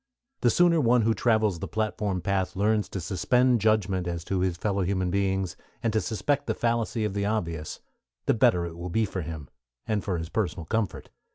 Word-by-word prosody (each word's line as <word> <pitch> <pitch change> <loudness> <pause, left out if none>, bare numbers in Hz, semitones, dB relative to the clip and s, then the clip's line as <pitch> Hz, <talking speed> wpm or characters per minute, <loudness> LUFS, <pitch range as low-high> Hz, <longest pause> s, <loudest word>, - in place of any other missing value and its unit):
The 120 - +3
sooner 170 +4 +4
one 120 -2 +4
who 115 +1 +3
travels 110 -6 +2
the - - -4
Platform 105 -3 -1
Path 95 -1 -1
learns 105 +2 +1
to 95 - -4
suspend 120 +7 +2
judgment 100 -4 +1
as 85 -1 -3
to 95 +1 -1
his 90 -2 0
fellow 100 +1 0
beings, 95 0 0 0.3
and 115 -2 +1
to 110 - +2
suspect 140 +6 -1
the - - 0
fallacy 115 -1 0
of 105 - -2
the 100 0 -1
obvious, 85 -8 -3 0.4
the - - +3
better 90 -1 +3
it 85 -1 -7
will 90 +1 -5
be 110 +5 +1
for 95 -2 -4
him, 80 -4 -6 0.4
and 105 -2 -1
for 95 -4 -1
his 80 0 -5
personal 90 -6 -2
comfort. 110 +3 -2
100 Hz, 195 wpm, -27 LUFS, 90-110 Hz, 0.4 s, sooner